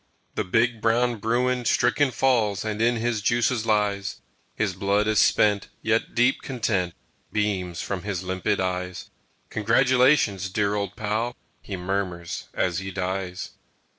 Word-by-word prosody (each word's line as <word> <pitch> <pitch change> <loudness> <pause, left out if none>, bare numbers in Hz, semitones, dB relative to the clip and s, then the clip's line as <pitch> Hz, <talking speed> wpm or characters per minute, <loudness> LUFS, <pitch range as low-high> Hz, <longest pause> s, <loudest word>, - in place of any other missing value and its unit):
The 110 - -1
big 115 +4 +1
brown 120 +1 +2
bruin 125 +4 0
stricken 125 +5 +3
falls 115 -6 +1
And 110 0 -2
in 120 +1 +3
his 115 -1 -1
juices 120 +1 +1
lies; 105 -2 0 0.4
His 105 -4 0
blood 100 +2 +1
is 110 -1 +3
spent, 105 -2 +3 0.2
yet 110 0 0
deep 125 +3 +3
content 100 -9 -1 0.4
Beams 95 -6 -1
from 95 -3 -3
his 100 -2 -3
limpid 95 +2 -1
eyes. 90 -1 -3 0.4
"Congratulations, 120 -3 +3
dear 100 +1 0
old 100 -2 -2
pal!" 110 +3 -2 0.3
He 100 - -6
murmurs 90 -2 -3
as 85 -2 0
he 95 0 -5
dies. 95 -1 -3
105 Hz, 135 wpm, -25 LUFS, 95-115 Hz, 0.4 s, stricken